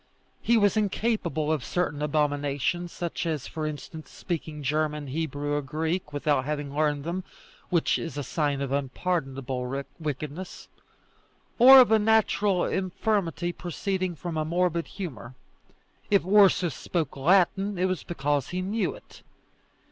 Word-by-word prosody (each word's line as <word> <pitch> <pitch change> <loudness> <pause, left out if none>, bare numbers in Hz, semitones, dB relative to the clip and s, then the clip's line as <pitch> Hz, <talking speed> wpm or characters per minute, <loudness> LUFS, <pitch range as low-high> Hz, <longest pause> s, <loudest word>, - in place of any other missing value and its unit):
He 235 - +3
was 205 -2 +3
incapable 205 - 0
of 155 -5 0
certain 150 -3 -2
abominations, 150 +3 0
such 170 0 -4
as, 155 -5 -2
for 155 -2 -4
instance, 155 +1 -7
speaking 155 -4 -5
German, 150 +1 -1
Hebrew, 145 0 -3
or 145 - +1
Greek, 160 +4 -3
without 145 -2 +1
having 145 -1 -4
learned 150 -2 +1
them, 175 +4 -3 0.5
which 170 -3 +2
is 165 -3 -6
a 145 - -2
sign 145 0 -1
of 135 -1 -3
unpardonable 135 -3 -2 0.2
wickedness, 155 +3 -6 0.9
or 265 +3 +10
of 245 -4 +6
a 220 - +6
natural 210 -3 +2
infirmity 185 -2 -1
proceeding 185 +1 -3
from 165 0 -5
a 155 - +1
morbid 170 +1 0
humour. 130 - -7 0.7
If 200 -4 +3
Ursus 190 -4 +5
spoke 165 -6 -3
Latin, 195 +6 +2
it 180 - +1
was 185 -1 -1
because 145 -4 -1
he 180 +1 -3
knew 210 +4 -1
it. - - -16
160 Hz, 140 wpm, -27 LUFS, 145-185 Hz, 0.9 s, or